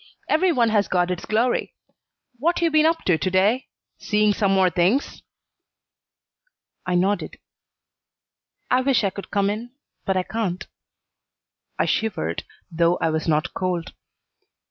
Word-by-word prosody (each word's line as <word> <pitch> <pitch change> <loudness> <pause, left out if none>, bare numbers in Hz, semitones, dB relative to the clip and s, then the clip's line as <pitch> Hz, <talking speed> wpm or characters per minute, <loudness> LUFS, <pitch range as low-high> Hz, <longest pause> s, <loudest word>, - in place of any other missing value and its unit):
Every 355 +4 +3
one 240 -7 +2
has 210 -2 +2
got 180 0 +1
its 180 - -4
glory. 230 +3 0 0.6
What 335 +6 +1
you 335 -1 +1
been 310 0 +4
up 330 0 0
to 170 -4 +2
to 185 - 0
day? 200 +7 +2 0.3
Seeing 210 -1 +2
some 200 -2 +1
more 190 -2 +3
things?" 185 - 0 1.7
I 180 - 0
nodded. 195 +3 0 1.3
"I 255 - +4
wish 260 -3 +2
I 195 - +1
could 200 - -9
come 200 -1 +1
in, 235 +4 -6 0.3
but 190 -1 0
I 185 - +1
can't." 190 -4 -3 1.1
I - - +1
shivered, 85 - -1 0.3
though 170 +1 +2
I 165 - 0
was 160 +1 -2
not 155 -1 0
cold. 180 -3 -3
200 Hz, 145 wpm, -23 LUFS, 180-235 Hz, 1.7 s, been